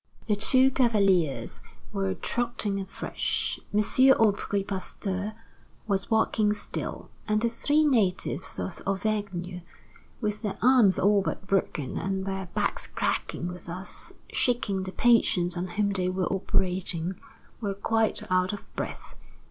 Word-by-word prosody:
The 215 - +2
two 260 +5 +5
cavaliers 200 - +2 0.3
were 95 -1 -1
trotting 230 -4 -1
afresh. 190 0 -2
M. 210 - +3 0.4
Aubry 205 -2 +2
Pasteur 195 +1 -4 0.5
was 195 -3 -1
walking 220 -1 +2
still; 210 - -5 0.2
and 215 0 +2
the 235 +1 +1
three 295 +6 +2
natives 205 -9 +1
of 190 - -4
Auvergne, 195 -3 -2 0.6
with 210 -2 -2
their 210 -4 -3
arms 240 -6 +5
all 205 +1 +4
but 195 - -4
broken 190 -8 -1
and 190 0 -2
their 190 -1 -3
backs - - -1
cracking 175 - -2
with 180 0 -8
thus 180 +3 -4 0.2
shaking 230 -6 +1
the 185 0 -5
patients 185 -7 +3
on 175 +1 -2
whom 200 +3 0
they 185 -2 +1
were 185 0 -1
operating, 185 -2 0 0.5
were 200 -3 -2
quite 225 +2 +1
out 185 +1 +2
of 205 - -10
breath. - - -5
195 Hz, 130 wpm, -27 LUFS, 185-215 Hz, 0.6 s, two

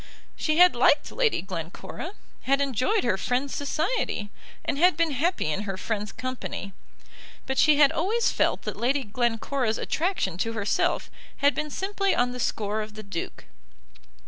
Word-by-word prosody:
She 310 0 0
had 360 +1 +7
liked - - +3
Lady 475 - +1
Glencora, 185 - -6 0.3
had 275 +1 +3
enjoyed 280 - +1
her 220 -6 +1
friend's 255 +6 -1
society, 285 - -1 0.3
and 280 - -1 0.2
been 335 -1 +2
happy 325 +7 0
in 175 - -1
her 195 -2 -4
friend's 210 0 -3
company, 255 -5 -5 0.7
but 265 0 -1
she 305 -1 +6
had 290 -2 +6
always 440 +7 +1
felt - - +1
that - - -4
Lady 270 +4 +1
Glencora's 235 +1 -1
attraction 310 - -1
to 225 +3 -1
herself 210 -2 0 0.3
had 285 +1 +4
been 305 0 -3
simply 390 +4 0
on 245 0 +2
the 250 - -6
score 215 -2 -1
of 215 0 -7
the 215 - -8
Duke. 200 -4 -6
255 Hz, 155 wpm, -26 LUFS, 215-310 Hz, 0.7 s, had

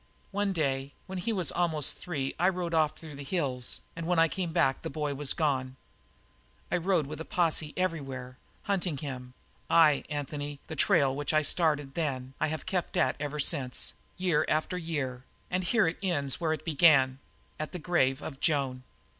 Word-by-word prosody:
"One 200 0 0
day 140 -5 -1
when 190 -1 -5
he 205 +6 -1
was 185 -8 0
almost 160 -5 +2
three 140 -6 -3
I 180 - +5
rode 180 -2 -3
off 155 -2 +2
through 160 -2 -9
the 140 0 -7
hills, 135 -6 -1
and 165 0 -5
when 180 -1 +2
I 165 0 +6
came 175 0 -3
back 135 -4 +2
the 165 - -4
boy 150 -1 -2
was 140 0 0
gone. 130 -5 0 1.0
I 180 - +3
rode 180 -3 +2
with 155 +3 -6
a - - -2
posse 160 -3 +1
everywhere, 135 -8 -3 0.2
hunting 185 -6 0
him; 125 -3 -6 0.3
aye, 155 -4 +6
Anthony, 145 0 -4
the 160 - -6
trail 135 -1 +3
which 145 +2 -1
I 155 - +4
started 150 -4 +1
then 135 -5 -2
I - - +2
have 155 +1 -4
kept 180 -1 -2
at - - +3
ever 145 +1 -3
since, 135 -4 +1 0.2
year 180 -4 +2
after 155 +4 0
year, 145 -8 -3 0.3
and 185 +1 0
here 215 +4 +3
it 165 - -2
ends 150 -7 -1
where 160 -2 +2
it 155 - -6
began 140 -5 +5 0.4
at 155 - -3
the - - -4
grave 150 -5 +1
of 135 -3 -6
Joan! 135 -5 +1
155 Hz, 185 wpm, -30 LUFS, 135-175 Hz, 1.0 s, I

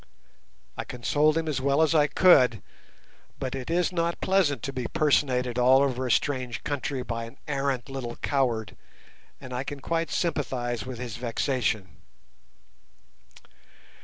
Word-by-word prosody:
I - - -4
consoled 150 +6 +1
him 165 -1 -1
as 145 -4 -1
well 140 +2 +2
as 160 0 +4
I 150 -2 +4
could, 130 - +5 0.7
but 130 -1 -4
it 135 +1 -5
is 175 +2 +1
not 170 -1 -1
pleasant 175 - +1
to 135 - -4
be 125 -2 -3
personated 125 -5 +1
all 130 +2 +6
over 130 -2 -1
a - - 0
strange 125 -4 0
country 145 -2 -3
by 115 -1 -4
an 115 +4 -13
arrant 140 -3 -1
little 130 -3 -5
coward, 120 -6 -1 0.6
and 125 - -9
I 125 +1 -2
can 145 0 -6
quite 165 +3 -1
sympathize 125 - -2
with 130 -2 -6
his 120 -2 -6
vexation. 115 - -1
130 Hz, 145 wpm, -27 LUFS, 125-150 Hz, 0.7 s, all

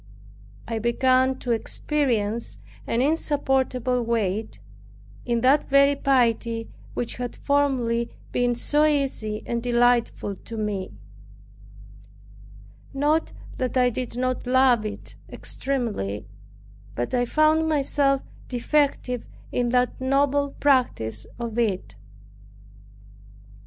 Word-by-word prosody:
I 225 -1 -2
began 255 +3 +2
to 245 - -2
experience 230 -2 -1 0.3
an 235 - +1
insupportable 265 -4 0
weight, 220 - -1 0.7
in 235 -1 +1
that 270 +4 +3
very 280 +1 +5
piety 235 -4 +1 0.3
which 240 - -3
had 245 -1 -4
formerly 255 -5 +1 0.2
been 245 -1 +1
so 295 +5 +2
easy 275 -8 0
and 235 0 -2
delightful 240 -4 +1
to 230 - -9
me; 205 -3 -2 2.1
not 300 +3 +1 0.3
that 255 0 -1
I 250 -1 +4
did 245 0 -4
not 255 0 -1
love 250 -4 +4
it 210 - -9
extremely, 210 - -2 0.7
but 120 - -3
I 245 -1 +2
found 310 +4 +3
myself 275 -2 +1 0.2
defective 250 -1 0 0.3
in 245 -1 0
that 250 +1 +1
noble 280 +1 +1
practice 180 - +1
of 235 -1 -4
it. 190 - -1
245 Hz, 100 wpm, -24 LUFS, 230-275 Hz, 2.1 s, very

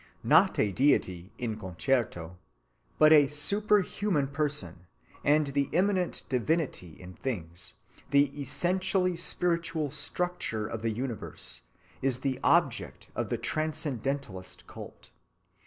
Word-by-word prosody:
Not - - +5
a 105 - +2
deity 95 -8 +1
in 110 -3 -3
concreto, 90 -3 -1 0.6
not 155 0 +7
a 150 -3 +8
superhuman 200 0 +1
person, 135 - -3 0.4
but 145 -1 +3
the 140 -1 +1
immanent 185 0 +1
divinity 130 - -1
in 90 0 -10
things, 90 -9 -5 0.3
the 140 0 +4
essentially 185 +5 0
spiritual 170 -3 -1
structure 155 -8 -2
of 110 +1 -5
the 115 - 0
universe, 120 0 -4 0.4
is 130 -2 0
the 130 -2 -1
object - - +1
of - - -2
the - - 0
transcendentalist 140 -9 -3
cult. - - -11
140 Hz, 110 wpm, -29 LUFS, 110-160 Hz, 0.6 s, a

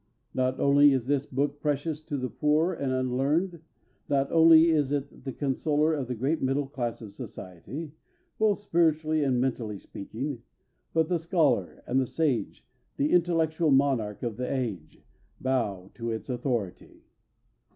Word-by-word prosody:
Not 130 0 0
only 140 0 +6
is 130 -3 0
this 140 0 0
book 145 +2 -2
precious 150 +1 -1
to 145 -3 -3
the 130 -1 -2
poor 155 +4 +2
and 140 -5 -2
unlearned, 140 +7 0 0.5
not 140 -1 +1
only 165 0 +7
is 145 -4 +1
it 140 -2 -4
the 135 - -3
consoler 150 +3 0
of 140 -5 -2
the 125 - -3
great 135 +8 -1
middle 135 +2 +1
class 120 -4 -4
of 100 -2 -10
society, 125 - -8 0.5
both 215 -2 +3
spiritually 160 -5 +1
and 130 -3 +1
mentally 120 -5 -2
speaking, 115 +7 -6 0.5
but 160 -1 +2
the 175 -1 0
scholar 160 - +1
and 130 +2 +1
the 130 - -1
sage, 150 -5 -1 0.3
the 145 +2 +1
intellectual 165 -2 +2
monarch 135 -7 +2
of 115 -3 -3
the 125 0 -3
age, 110 - -4 0.4
bow 105 -8 -1
to 115 0 -5
its 110 +3 -4
authority. 120 -6 -4
140 Hz, 150 wpm, -28 LUFS, 125-155 Hz, 0.5 s, only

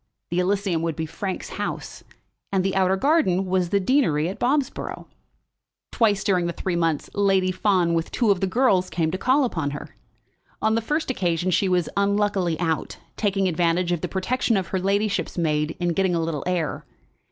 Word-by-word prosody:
The 175 - +1
Elysium 190 -2 0
would 165 -2 -2
be 160 - -3
Frank's 185 +4 -5
house; - - -5 0.5
and 190 -2 +1
the 195 - 0
outer 190 0 +3
garden 195 - +2
was 185 -1 0
the 200 - +2
deanery 185 - +2
at 190 - -7
Bobsborough. 275 +2 -1 0.9
Twice 210 -4 +2
during 180 -3 +1
the 170 - -2
three 185 0 -2
months 165 -3 0
Lady 195 -2 +2
Fawn, 185 -3 +2
with 165 -1 -1
two 230 -4 +2
of 195 - +1
the 195 - 0
girls, 190 -4 +2
came 160 -2 -1
to 185 - -2
call 265 +6 +3
upon 160 - -1
her. 145 0 -8 0.6
On 220 - +1
the 230 - +1
first 295 +4 -1
occasion 175 -4 0
she 190 +2 +2
was 180 -3 +1
unluckily 200 -4 +1
out, 165 -2 -2 0.2
taking 195 -2 +1
advantage 175 0 +1
of 175 -3 -1
the - - -2
protection 225 +4 0
of 185 -3 -3
her 190 - -1
ladyship's 200 +2 0
maid 155 -2 0
in 175 -1 0
getting 180 +1 +1
a - - +1
little 160 -3 -2
air. 175 -5 -1
185 Hz, 185 wpm, -24 LUFS, 170-200 Hz, 0.9 s, outer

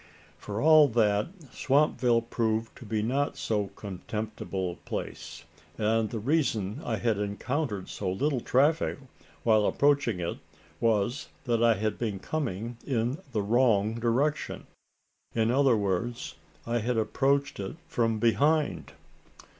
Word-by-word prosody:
For 105 +1 -5
all 155 0 +7
that, 105 -4 +2 0.3
Swampville 130 -4 +2
proved 115 -1 -1
to 125 - -11
be 110 0 -1
not 135 +5 0
so 105 -2 -1
contemptible 100 -1 -4
a - - -9
place; - - -6 0.3
and 110 0 +1
the 115 - -4
reason 115 -3 0
I 115 - -1
had 110 -1 0
encountered 105 +1 -2
so 90 - -3
little 135 +7 0
traffic, 145 +7 +2 0.5
while 110 -2 +4
approaching 140 -8 +2
it, 85 0 -3 0.4
was 115 +3 +1 0.2
that 120 -3 0
I 115 -1 +5
had 105 +1 -2
been 110 -4 -2
coming 120 -2 -3
in 125 +2 -1
the 105 -4 0
wrong 110 -1 +3
direction 130 +6 0 0.7
in 115 0 +2
other 135 -3 +4
words, 100 +4 -2 0.3
I 120 0 0
had 120 +2 -1
approached 140 +5 +1
it 95 +5 -4
from 115 -2 0
behind. 145 +8 +1
115 Hz, 130 wpm, -28 LUFS, 105-135 Hz, 0.7 s, all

